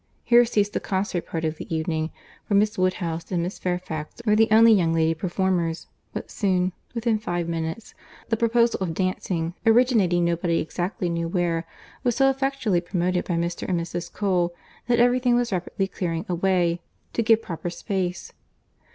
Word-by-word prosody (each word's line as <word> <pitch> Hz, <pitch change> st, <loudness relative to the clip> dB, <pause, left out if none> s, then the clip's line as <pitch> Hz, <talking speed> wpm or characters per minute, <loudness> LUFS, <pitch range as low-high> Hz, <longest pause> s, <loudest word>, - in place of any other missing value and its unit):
Here 240 Hz, 0 st, +6 dB
ceased 205 Hz, -3 st, 0 dB
the -, -, 0 dB
concert 190 Hz, -2 st, -2 dB
part 165 Hz, -1 st, -3 dB
of 155 Hz, 0 st, -2 dB
the -, -, -9 dB
evening, 160 Hz, 0 st, -1 dB, 0.4 s
for 205 Hz, -, +1 dB
Miss 210 Hz, +2 st, +3 dB
Woodhouse 175 Hz, -3 st, -1 dB
and 175 Hz, -2 st, 0 dB
Miss 180 Hz, +3 st, -5 dB
Fairfax 180 Hz, -3 st, -4 dB
were 210 Hz, -1 st, +4 dB
the 225 Hz, +1 st, +5 dB
only 225 Hz, +1 st, +7 dB
young 170 Hz, -5 st, +2 dB
lady 160 Hz, 0 st, +3 dB
performers; 175 Hz, -1 st, -1 dB, 0.3 s
but -, -, -6 dB
soon 185 Hz, -3 st, +1 dB, 0.2 s
(within 230 Hz, -2 st, +1 dB
five 175 Hz, -5 st, -2 dB
minutes) 165 Hz, +5 st, -4 dB, 0.4 s
the 225 Hz, -, +2 dB
proposal 235 Hz, +1 st, +2 dB
of 175 Hz, -4 st, -2 dB
dancing—originating 185 Hz, +2 st, +2 dB
nobody 170 Hz, 0 st, +1 dB
exactly 180 Hz, +4 st, -2 dB
knew 170 Hz, -1 st, -1 dB
where—was 175 Hz, +7 st, -2 dB
so 270 Hz, 0 st, +4 dB
effectually 270 Hz, -9 st, 0 dB
promoted 180 Hz, 0 st, -1 dB
by 175 Hz, -, -1 dB
Mr. 170 Hz, +2 st, -2 dB
and 180 Hz, -2 st, +1 dB
Mrs. 170 Hz, +1 st, -5 dB
Cole, 180 Hz, -4 st, 0 dB, 0.3 s
that 240 Hz, -1 st, +3 dB
every 245 Hz, +1 st, +4 dB
thing 245 Hz, -1 st, +3 dB
was 240 Hz, -1 st, +1 dB
rapidly 195 Hz, +2 st, -1 dB
clearing 170 Hz, -2 st, -3 dB
away, 175 Hz, -1 st, +1 dB, 0.3 s
to -, -, +1 dB
give 225 Hz, 0 st, +4 dB
proper 175 Hz, 0 st, -4 dB
space. 185 Hz, 0 st, -3 dB
180 Hz, 165 wpm, -24 LUFS, 170-215 Hz, 0.4 s, only